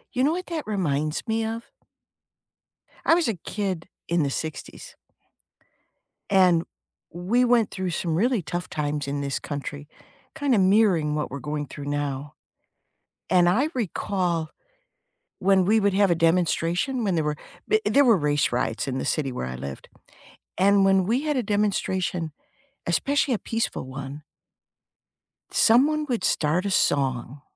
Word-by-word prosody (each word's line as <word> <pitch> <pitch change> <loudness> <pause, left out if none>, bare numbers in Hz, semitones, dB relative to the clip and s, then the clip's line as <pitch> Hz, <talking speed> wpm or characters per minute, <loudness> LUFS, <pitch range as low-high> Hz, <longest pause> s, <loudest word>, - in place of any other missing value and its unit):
You 255 - +2
know 295 - +3
what 365 +1 -4
that 320 -8 -5
reminds 155 -4 -1
me 225 0 0
of? 225 +1 -5 1.3
I 330 - +6
was 340 -6 +1
a 225 - +1
kid 185 -1 -4 0.2
in 170 -2 +1
the 140 - 0
'60s 155 +2 -6 1.3
and 180 -4 +4 0.5
we 205 +9 +1
went 235 -3 +3
through 185 -2 -3
some 165 -1 -1
really 235 +2 +2
tough 175 +3 -5
times 145 -1 -2
in 140 0 -2
this 140 -1 -2
country, 145 0 -6 0.5
kinda 285 -7 +1
mirroring 185 -6 +3
what 150 - -2
we're 140 - -6
going 145 +2 -4
through 145 - -8
now, 145 -1 -3 1.0
and 175 -1 +5
I 260 - +2
recall 180 -7 -1 0.9
when 190 -1 +3
we 220 +3 +4
would 200 -1 +2
have 200 -1 +3
a 170 - +4
demonstration, 175 - +1
when 195 -4 +1
there 160 - +1
were 150 0 -1 0.3
b 435 - +3
there 280 0 +4
were 230 -4 +6
race 145 -4 +1
riots 120 0 -1
in 130 0 -2
the - - -3
city 135 -4 -1
where 65 - -4
I 65 - -5
lived, 70 +1 -8 0.7
and 200 +1 +4
when 195 -1 +4
we 240 +6 +1
had 300 -3 0
a 245 - 0
demonstration, 190 -5 -1 0.6
especially 275 - +1
a - - -1
peaceful 225 - -2
one 135 +2 -7 1.3
someone 295 +7 +4
would 240 -3 -2
start 165 +5 +1
a 200 - -1
song. 135 -4 0
180 Hz, 150 wpm, -25 LUFS, 150-220 Hz, 1.3 s, I